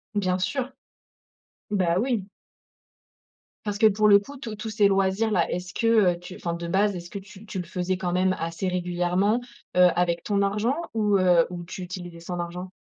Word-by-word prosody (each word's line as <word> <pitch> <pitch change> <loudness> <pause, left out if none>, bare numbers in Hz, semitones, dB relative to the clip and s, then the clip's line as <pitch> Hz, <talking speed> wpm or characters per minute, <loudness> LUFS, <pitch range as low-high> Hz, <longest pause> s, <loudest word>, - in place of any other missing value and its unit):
Bien 185 -3 +1
sûr. 265 +7 -2 1.0
Bah 180 -4 +1
oui. 235 -4 0 1.4
Parce 205 -1 -2
que 220 - +4
pour 215 0 +3
le 200 -1 +8
coup 280 +8 -11
tous 235 -5 -6
tous 215 +1 -6
ces 210 -1 +4
loisirs 195 +2 +2
là, 180 -5 +2
est-ce 180 +1 -4
que, 230 - +1 0.3
heu, - - -12
tu 180 +1 -10
enfin 170 - -3
de 170 0 -5
base, 195 +3 +2
est-ce 175 -1 -7
que 200 - -5
tu 200 +2 -14
tu 190 -2 -5
le 180 - -4
faisais 180 +2 -2
quand 180 -1 -2
même 185 +1 +2
assez 165 +3 -3
régulièrement, 180 +4 +1 0.4
heu, 180 0 +8
avec 170 -1 +1
ton 200 -1 +1
argent 210 +6 +1 0.2
ou, 210 -2 +3
heu, 180 -2 +5
ou 175 -1 -6
tu 185 +2 -8
utilisais 175 -1 -7
son 175 +1 -5
argent? 180 +2 -5
185 Hz, 195 wpm, -25 LUFS, 180-205 Hz, 1.4 s, le